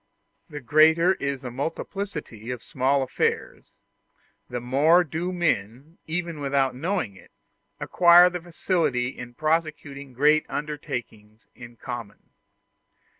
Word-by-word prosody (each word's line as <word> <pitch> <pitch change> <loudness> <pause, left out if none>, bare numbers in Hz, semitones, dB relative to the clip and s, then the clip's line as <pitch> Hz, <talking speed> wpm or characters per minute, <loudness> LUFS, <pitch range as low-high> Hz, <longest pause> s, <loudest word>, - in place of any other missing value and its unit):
The 145 -2 -7
greater 160 +7 +4
is 140 -5 -4
the 125 -3 -6
multiplicity 150 - -5
of 125 -2 -5
small 135 -1 +1
affairs, 130 - -3 0.7
the 125 - -3
more 145 +8 +4
do 170 +3 -4
men, 145 - -2
even 170 -1 -3
without 135 -2 0
knowing 160 - -2
it, - - -17 0.5
acquire 175 0 +6
facility 170 -7 -1
in 125 -2 -10
prosecuting 155 -3 -2
great 150 +4 +3
undertakings 120 -8 -6
in 120 0 -12
common. 120 -4 -8
145 Hz, 110 wpm, -25 LUFS, 125-165 Hz, 0.7 s, acquire